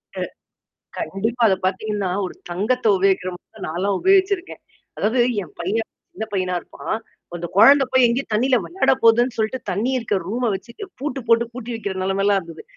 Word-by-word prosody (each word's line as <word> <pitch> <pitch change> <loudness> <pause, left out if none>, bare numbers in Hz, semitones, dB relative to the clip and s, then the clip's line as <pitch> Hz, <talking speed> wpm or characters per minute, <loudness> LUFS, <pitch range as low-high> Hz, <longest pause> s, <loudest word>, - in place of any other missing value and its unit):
அ. - - -4 0.8
கண்டிப்பா. 225 +5 -2
அத 195 - +4
பார்த்தீங்கன்னா, 200 0 -1 0.2
ஒரு - - -8 0.2
தங்கத்த 215 +8 0
உபயோகிக்கிறமாரி 190 +2 -1
நான்லாம் 190 +5 -1
உபயோகிச்சிருக்கேன். 380 0 +2 0.4
அதாவது 230 +4 +1 0.2
என் - - -12
பையன், 210 +6 -1 0.2
சின்ன 220 - -4
பையனா 185 -2 0
இருப்பான். 220 - -5 0.4
அந்த 175 0 -4
குழந்த 275 +6 +7
போய் 260 -1 +5
எங்கேயும் 240 +3 -1
தண்ணீல 250 +4 +3
விளையாட 370 -4 +1
போதுன்னு 235 +2 +4
சொல்லிட்டு 220 +3 -1
தண்ணீ 205 +8 0
இருக்கிற 225 -5 0
ரூம 240 +3 0
வச்சு 215 +5 -7 0.3
பூட்டு 275 -1 -3
போட்டு 230 +1 +4
பூட்டி 245 0 -7
வைக்கிற 220 -3 -3
நிலமையிலாம் 195 +1 +2
இருந்தது. 165 -2 -11
220 Hz, 155 wpm, -21 LUFS, 195-250 Hz, 0.8 s, குழந்த